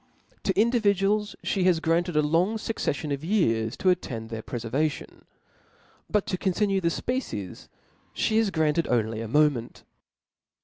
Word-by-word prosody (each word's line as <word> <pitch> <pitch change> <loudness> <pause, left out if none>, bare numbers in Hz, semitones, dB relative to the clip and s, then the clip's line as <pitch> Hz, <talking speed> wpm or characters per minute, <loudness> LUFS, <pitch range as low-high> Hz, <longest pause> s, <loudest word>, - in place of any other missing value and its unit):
To 190 0 +1
individuals 210 -2 +2
flie 195 - 0
has 180 -2 +3
granted 165 +1 0
a 150 - +4
long 170 +8 +2
fucccflion 155 -9 -2
of 140 +1 -5
years 115 - +1
to 185 - +3
attend 115 -10 -3
to - - -8
their 110 - -4
ptc 120 0 -6
fcrvation; 150 +3 -2 0.8
but 210 -2 +1
to 185 - -3
continue 195 0 +1
the 170 - +1
fpecies, 170 - -3 0.4
(he 220 - 0
has 225 -2 +3
granted 160 -1 +1
only 110 -2 0
a 115 - -4
moment. 145 -2 +1
170 Hz, 150 wpm, -26 LUFS, 130-200 Hz, 0.8 s, a